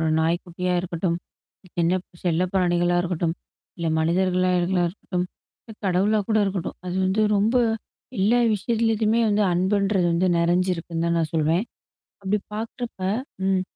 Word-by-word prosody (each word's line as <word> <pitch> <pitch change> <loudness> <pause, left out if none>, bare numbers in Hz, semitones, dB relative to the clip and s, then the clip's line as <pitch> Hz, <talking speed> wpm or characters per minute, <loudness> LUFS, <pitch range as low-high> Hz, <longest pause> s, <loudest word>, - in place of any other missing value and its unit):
ஒரு 160 - +1
நாய்க்குட்டியா 175 +2 -1
இருக்கட்டும், 170 -1 -2 0.7
என்ன 175 +3 +2 0.3
செல்ல 175 0 +2
பிராணிகளா 175 -2 +2
இருக்கட்டும், 170 -1 -1 0.4
இல்ல 170 -1 -3
மனிதர்களாகளா 180 +1 +2
ளா 175 - +3
இருக்கட்டும். 180 0 -3 0.5
இல்ல - - -9
கடவுளா 195 +4 +2
கூட 220 -1 +3
இருக்கட்டும். 190 -3 -3
அது 180 - -4
வந்து 195 +3 +2
ரொம்ப 215 +5 +2 0.6
எல்லா 210 +6 +3 0.2
விஷயத்துலயுமே 225 +1 +1
வந்து 210 0 +2
அன்புன்றது 190 +1 +2
வந்து 170 +2 +2
நெறஞ்சிருக்குன்னு 170 -1 0
தான் 170 0 +1
நான் 160 -2 -1
சொல்வேன். 160 +3 +2 0.6
அப்பிடி 200 +2 0
பாக்கிறப்ப, 230 +1 -5 0.5
ம். 190 -1 +2
180 Hz, 130 wpm, -24 LUFS, 170-200 Hz, 0.7 s, ளா